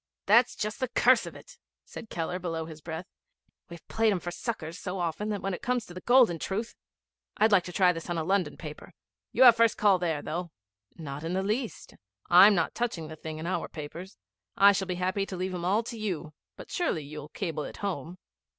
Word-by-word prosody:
'That's 230 Hz, +4 st, +5 dB
just 215 Hz, +3 st, -3 dB
the 255 Hz, -, 0 dB
curse -, -, +4 dB
of -, -, -9 dB
it,' -, -, -14 dB, 0.3 s
said 225 Hz, -, -10 dB
Keller 170 Hz, +2 st, -3 dB
below 165 Hz, -3 st, -3 dB
his 160 Hz, -1 st, -10 dB
breath. 160 Hz, +3 st, -6 dB, 0.6 s
'We've 170 Hz, -1 st, -12 dB
played 225 Hz, -1 st, +2 dB
'em 195 Hz, -, 0 dB
for 175 Hz, -, -5 dB
suckers 175 Hz, -4 st, -5 dB
so 185 Hz, 0 st, -4 dB
often 175 Hz, +4 st, -2 dB
that 205 Hz, -2 st, -3 dB
when 195 Hz, 0 st, -1 dB
it -, -, -5 dB
comes 245 Hz, -3 st, -1 dB
to 175 Hz, -, -12 dB
the 185 Hz, -, -8 dB
golden 240 Hz, -9 st, +4 dB
truth 220 Hz, +7 st, -3 dB, 0.6 s
I'd 220 Hz, +1 st, +4 dB
like 195 Hz, -3 st, +5 dB
to 180 Hz, -, -6 dB
try 180 Hz, -1 st, +4 dB
this 165 Hz, +1 st, -7 dB
on 175 Hz, -, -1 dB
a 160 Hz, -, -1 dB
London 185 Hz, -3 st, 0 dB
paper. 150 Hz, -2 st, -9 dB, 0.4 s
You -, -, +4 dB
have 240 Hz, -3 st, +9 dB
first 230 Hz, -1 st, +3 dB
call 200 Hz, -3 st, +4 dB
there, 160 Hz, -4 st, -1 dB
though.' 175 Hz, +2 st, -4 dB, 0.5 s
'Not 145 Hz, -2 st, -7 dB
in 165 Hz, +2 st, -3 dB
the 190 Hz, +1 st, 0 dB
least. 220 Hz, +4 st, -3 dB, 0.4 s
I'm 195 Hz, +4 st, +9 dB
not 165 Hz, -, 0 dB
touching 185 Hz, -10 st, -3 dB
the 160 Hz, -, -8 dB
thing 155 Hz, 0 st, -7 dB
in 160 Hz, -, -6 dB
our 185 Hz, -, -2 dB
papers. 165 Hz, +5 st, -9 dB, 0.4 s
I 200 Hz, +1 st, +8 dB
shall 195 Hz, -1 st, -1 dB
be 180 Hz, -, -2 dB
happy 185 Hz, +2 st, -1 dB
to 185 Hz, -, -6 dB
leave 185 Hz, +1 st, -3 dB
'em 175 Hz, -1 st, -4 dB
all 205 Hz, +5 st, +2 dB
to 235 Hz, 0 st, -7 dB
you; 175 Hz, -7 st, -4 dB, 0.2 s
but -, -, -11 dB
surely 335 Hz, -, -1 dB
you'll 150 Hz, +1 st, -9 dB
cable 160 Hz, -3 st, -4 dB
it -, -, -8 dB
home?' 180 Hz, -3 st, -4 dB
180 Hz, 225 wpm, -28 LUFS, 165-210 Hz, 0.6 s, have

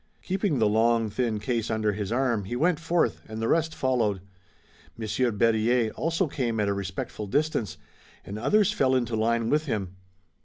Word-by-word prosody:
Keeping 190 Hz, -5 st, 0 dB
the 110 Hz, -3 st, +3 dB
long, 115 Hz, +1 st, +2 dB
thin 115 Hz, 0 st, -1 dB
case 115 Hz, 0 st, -2 dB
under 110 Hz, -1 st, +1 dB
his 105 Hz, 0 st, -4 dB
arm, 120 Hz, -5 st, +1 dB
he 120 Hz, -, -4 dB
went 165 Hz, +5 st, +2 dB
forth, 170 Hz, +1 st, 0 dB
and 110 Hz, 0 st, -6 dB
the 115 Hz, -, -1 dB
rest 160 Hz, +2 st, +1 dB
followed. 115 Hz, -7 st, 0 dB, 0.8 s
Monsieur 115 Hz, +3 st, 0 dB
Berryer 115 Hz, +1 st, +2 dB
also 165 Hz, -, 0 dB
came 120 Hz, -6 st, -2 dB
at 105 Hz, -, +1 dB
a 100 Hz, -, +1 dB
respectful 100 Hz, +2 st, -5 dB
distance, 140 Hz, -, -1 dB, 0.5 s
and 100 Hz, +2 st, -6 dB
others 210 Hz, -, +3 dB
fell 135 Hz, -10 st, +2 dB
into 120 Hz, -3 st, 0 dB
line 115 Hz, +1 st, +1 dB
with 155 Hz, +1 st, +1 dB
him. 95 Hz, -6 st, -3 dB
115 Hz, 170 wpm, -26 LUFS, 110-135 Hz, 0.8 s, the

